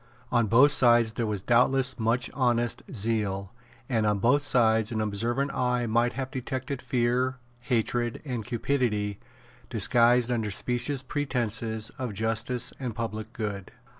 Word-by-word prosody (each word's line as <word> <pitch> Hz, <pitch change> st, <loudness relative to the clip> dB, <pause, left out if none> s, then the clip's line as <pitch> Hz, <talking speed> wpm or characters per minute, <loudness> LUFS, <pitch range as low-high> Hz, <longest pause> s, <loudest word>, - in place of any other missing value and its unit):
On 120 Hz, -2 st, +2 dB
both 130 Hz, +7 st, +6 dB
sides 120 Hz, -5 st, +4 dB
there 115 Hz, +1 st, -2 dB
was 105 Hz, -3 st, -3 dB
doubtless 125 Hz, +2 st, +2 dB
much 115 Hz, +2 st, 0 dB
honest 120 Hz, -3 st, 0 dB
zeal; 105 Hz, -4 st, -1 dB, 0.3 s
and 115 Hz, -5 st, 0 dB
on 105 Hz, -1 st, +2 dB
both 125 Hz, +8 st, +3 dB
sides 110 Hz, -5 st, +2 dB
an 110 Hz, -, -2 dB
observant 120 Hz, +7 st, -1 dB
eye 125 Hz, -1 st, 0 dB
might 120 Hz, +2 st, +1 dB
have 130 Hz, -1 st, -4 dB
detected 130 Hz, +1 st, -4 dB
fear, 125 Hz, +1 st, 0 dB, 0.3 s
hatred, 120 Hz, -1 st, 0 dB
and 125 Hz, -5 st, -3 dB
cupidity 115 Hz, -4 st, -1 dB, 0.5 s
disguised 120 Hz, 0 st, +4 dB
under 115 Hz, -3 st, -1 dB
specious 125 Hz, +6 st, -1 dB
pretences 115 Hz, -5 st, -2 dB
of 125 Hz, -6 st, -4 dB
justice 115 Hz, +3 st, -1 dB
and 125 Hz, -5 st, -4 dB
public 110 Hz, -1 st, -4 dB
good. 105 Hz, -5 st, -5 dB
120 Hz, 135 wpm, -27 LUFS, 110-125 Hz, 0.5 s, both